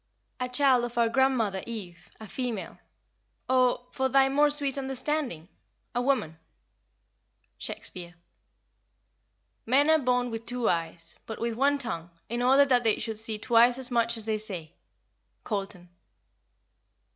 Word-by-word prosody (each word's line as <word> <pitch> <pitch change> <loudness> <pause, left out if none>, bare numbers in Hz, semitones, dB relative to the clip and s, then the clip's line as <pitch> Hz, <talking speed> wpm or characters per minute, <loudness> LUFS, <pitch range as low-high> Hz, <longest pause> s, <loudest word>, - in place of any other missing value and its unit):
"A 250 0 -2
child 255 -1 +3
of 240 0 -5
our 230 -1 +3
grandmother 230 -6 +1
Eve, 180 -7 -8
a 220 - -9
female; 240 -3 -5 0.7
or, 255 -1 +2
for 265 0 0
thy 270 0 +4
more 295 +2 +4
sweet 285 -2 -2
understanding, 270 - -2 0.5
a 245 - 0
woman." 245 - 0 1.2
SHAKESPEARE. 175 -1 -6 1.5
"Men 280 +6 +4
are 315 - +5
born 250 -2 0
with 225 0 -6
two 245 -1 -1
eyes, 165 0 -2
but 220 - -6
with 235 0 -1
one 280 +5 +2
tongue, 175 -11 -5 0.2
in 240 +2 -2
order 270 +3 +5
that 250 -3 +3
they 220 -2 +2
should 220 -2 -2
see 220 -1 0
twice 240 +2 +4
as 260 -1 +1
much 235 -1 +1
as 220 - -3
they 215 -1 -1
say." 180 -7 -4 0.7
COLTON. 195 -4 -4
240 Hz, 140 wpm, -28 LUFS, 215-265 Hz, 1.5 s, are